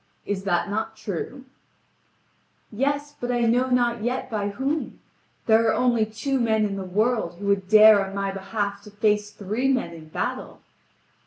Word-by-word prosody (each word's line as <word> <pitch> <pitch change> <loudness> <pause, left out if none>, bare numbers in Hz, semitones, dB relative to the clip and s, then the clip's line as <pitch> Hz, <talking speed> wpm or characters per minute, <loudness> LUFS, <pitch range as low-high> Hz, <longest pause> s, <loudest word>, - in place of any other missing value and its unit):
Is 200 -1 -3
that 175 -1 +1
not 220 +2 -3
true:" 220 +7 -6 1.3
"Yes, 285 +5 -1
but 245 0 -1
I 240 -1 0
know 245 +3 +2
not 240 -2 +1
yet 250 +2 -2
by 205 -2 -1
whom. 270 +9 -3 0.5
There 225 0 +4
are 220 - +3
only 240 -3 +2
two 265 +5 -2
men 220 -2 +2
in 200 -1 -3
the 195 - -4
world 210 -1 0
who 200 - -7
would 200 -2 +1
dare 215 -1 +8
on 195 0 -7
my 195 0 -1
behalf 200 +1 -3
to - - -10
face 210 0 0
three 210 +5 -2
men 255 -10 0
in 160 -1 -12
battle." - - -4
215 Hz, 170 wpm, -24 LUFS, 200-245 Hz, 1.3 s, dare